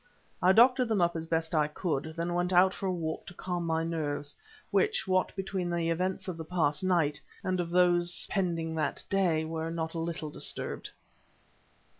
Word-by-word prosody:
I 180 - +6
doctored 250 +4 +5
them 220 -3 +1
up 170 -1 +2
as 165 0 -4
best 160 0 -1
I 150 -2 +3
could, 155 -1 -3
then 170 +1 -1
went 175 +1 0
out 185 +1 +5
for 195 - -4
a - - +1
walk 160 -3 -4
to 175 - -10
calm 175 -1 -3
my 160 0 +1
nerves, 150 -3 -2 0.4
which, 440 - +1
what 185 0 +2
between 190 -2 -2
the 170 -1 0
events 185 +3 -1
of 180 -3 -4
the 165 - -5
past 155 -2 0
night, 165 -6 +2 0.2
and 185 -1 0
of 170 -1 -1
those 175 0 +3
pending 165 -4 -1
that 150 -2 0
day, 175 -5 +2
were 160 0 -3
not 160 -1 -3
a 165 - -3
little 165 -2 -3
disturbed. - - -4
170 Hz, 190 wpm, -30 LUFS, 160-185 Hz, 0.4 s, I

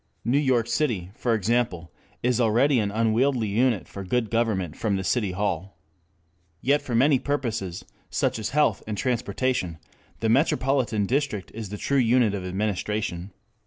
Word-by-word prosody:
New 125 +5 +3
York 130 -5 +2
City, 115 - -1
for 115 0 0
example, 105 -5 0 0.3
is 125 0 +2
already 120 +4 +3
an 105 -2 0
unwieldy 115 +2 +1
unit 115 0 +1
for 100 - -7
good 115 +3 -1
government 105 -8 0
from 105 -3 -1
the 95 - -2
City 100 -2 0
Hall. 95 -1 -2 0.8
Yet 140 - +2
for 120 - -3
many 135 +3 +4
purposes, 115 -12 -3 0.2
such - - 0
as 110 - -2
health 150 +4 +2
and 105 -1 -3
transportation, 120 -6 -1 0.4
the 115 - 0
metropolitan 130 -4 +2
district 125 -5 -1
is 110 -3 -6
the 105 - -5
true 140 +6 +1
unit 120 -3 +3
of 100 -2 -3
administration. 100 -1 -2
115 Hz, 155 wpm, -25 LUFS, 100-125 Hz, 0.8 s, many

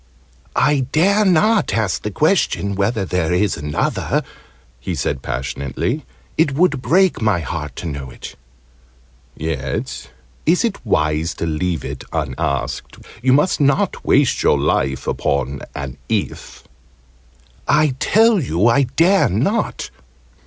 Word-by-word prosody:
"I 140 -3 +2
dare 200 +7 +3
not 200 - +3
ask 105 -4 0
the 105 - -3
question 150 - +1
whether 100 +1 0
there 90 -3 -1
is 95 +2 +1
another!" 75 0 -1 0.6
he 85 +8 -4
said 70 -1 -2
passionately. 65 0 -3 0.3
"It 150 -4 +3
would 150 -4 +2
break 180 +8 +3
my 105 -6 +2
heart 75 -4 -5
to - - -7
know 70 -4 -5
it!" - - -10 1.0
"Yet 70 -5 -4 0.4
is 175 +7 +4
it 220 -4 -3
wise 75 -6 0
to - - -3
leave 80 +1 -2
it - - -6
unasked? 70 -4 -3 0.2
You 130 +1 +3
must 150 +4 +2
not 140 -1 +1
waste - - +3
your - - +3
life 65 -1 0
upon 70 0 -1
an 70 -1 -5
'if'!" - - -3 1.0
"I 150 -2 +3
tell 225 -1 +4
you 95 - 0
I 130 +4 +4
dare 190 +4 +4
not! 150 - -1
100 Hz, 130 wpm, -19 LUFS, -, 1.0 s, is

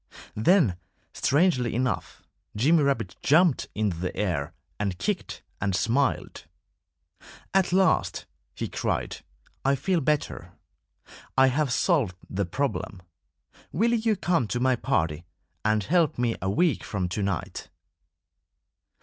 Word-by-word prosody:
Then, 110 - +3 0.4
strangely 140 - +2
enough, 125 0 -2 0.3
Jimmy 150 +9 +4
Rabbit 125 -10 0
jumped 155 0 +3
into 105 -5 0
the 90 +2 -4
air 85 -7 -1 0.3
and 100 -3 -1
kicked 205 - -3 0.2
and 95 -1 0
smiled. 130 +9 0 1.1
"At 190 -2 +3
last," 190 -2 +2 0.3
he - - -3
cried, - - -2 0.5
"I 135 +1 +3
feel 170 +6 0
better. 135 - -1 0.8
I 130 0 +6
have 145 -2 +1
solved 130 - +1
the 100 +1 -2
problem. 100 -5 -3 0.7
Will 230 +8 +2
you 225 -1 +2
come 175 - +1
to 120 - -2
my 130 0 +3
party 85 - -1 0.4
and 110 -1 +2
help 165 - +2
me 120 -2 0
a 95 - -1
week 165 - +1
from 100 -4 -2
to 95 +4 -3
night?" 95 -4 -3
125 Hz, 125 wpm, -26 LUFS, 100-165 Hz, 1.1 s, I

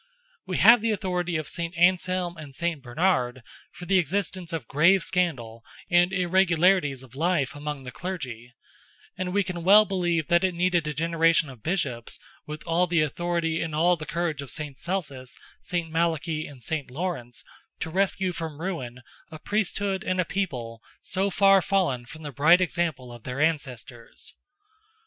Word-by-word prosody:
We 185 - -2
have 230 +2 +7
the 230 - 0
authority 180 -4 -1
of 155 - -4
Saint 170 0 -4
Anselm 180 0 +2
and 150 -4 -10
Saint 170 -2 -2
Bernard, 130 -2 0 0.3
for 175 - -10
the 190 +1 +3
existence 180 +1 -2
of 165 -3 -4
grave 170 +6 +4
scandal 125 -11 -2 0.3
and 175 +1 +4
irregularities 180 -5 +2
of 125 -3 -16
life 155 -2 0
among 145 -1 -5
the 125 - -7
clergy, 130 -11 -6 0.6
and 185 -1 -3
we 200 +2 +2
can 180 -3 -5
well 205 +4 +7
believe 175 -5 0
that 170 0 +4
it 185 -2 +1
needed 175 -2 +1
a 150 - -2
generation 165 0 +2
of 125 -4 -14
Bishops, 140 - -2 0.3
with 150 0 -7
all 175 +2 +2
the 165 -3 +2
authority 165 +1 -1
and 160 -2 -3
all 175 +3 +4
the 155 -2 -8
courage 165 -3 -2
of 140 - -8
Saint 145 0 -5
Celsus, 155 -9 -4 0.2
Saint 170 -2 -3
Malachy, 160 -1 -1
and 135 -4 -13
Saint 155 -5 -3
Lawrence, 130 -5 -5 0.4
to 160 - -4
rescue 190 0 +1
from 160 -3 -6
ruin 130 -9 -5 0.3
a 160 - -9
Priesthood 200 +1 -1
and 185 0 -1
a 180 - +2
people, 125 - -4 0.2
so 195 +2 0
far 195 0 +5
fallen 170 -12 0
from 155 +3 -11
the 145 - -5
bright 160 +7 +5
example 165 -8 -1
of 120 - -11
their 125 +4 -5
ancestors. 130 -6 -3
165 Hz, 170 wpm, -26 LUFS, 145-180 Hz, 0.6 s, have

